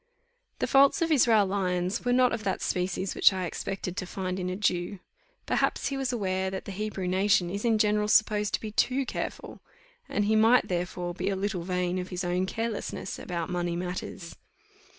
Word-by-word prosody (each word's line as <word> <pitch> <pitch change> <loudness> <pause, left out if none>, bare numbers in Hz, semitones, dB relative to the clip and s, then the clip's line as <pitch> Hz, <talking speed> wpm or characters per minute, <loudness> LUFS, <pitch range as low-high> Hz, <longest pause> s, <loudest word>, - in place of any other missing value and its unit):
The - - 0
faults 280 +7 +5
of 330 - -1
Israel 230 -8 +5
Lyons 185 0 -1
were 245 - +1
not 250 0 +4
of 225 -2 -3
that 195 -2 -2
species 185 +1 -1
which - - +6
I 185 -1 -2
expected 180 +1 -4
to 185 - -3
find 185 0 -3
in 180 0 -2
a 185 - -2
Jew. 185 -1 -1 0.5
Perhaps - - 0
he 275 - -3
was 270 -2 -1
aware 190 -5 -1
that 190 0 -5
the - - -6
Hebrew 195 -1 -3
nation 185 -1 +2
is 200 +2 -4
in 230 -2 +3
general 210 0 +2
supposed 210 -1 +3
to - - -5
be 215 - -6
too 260 +5 +1
careful, - - -5 0.5
and 205 - 0
he 215 +1 +2
might, 225 +3 +5
therefore, 175 0 -2
be 180 - -2
a 195 - 0
little 190 -2 -2
vain 180 +1 -1
of 180 - -5
his 180 0 -3
own 180 +1 0
carelessness 225 -3 -4
about 170 -1 -4
money 175 -1 -1
matters. 180 -1 -5
190 Hz, 195 wpm, -28 LUFS, 180-215 Hz, 0.5 s, which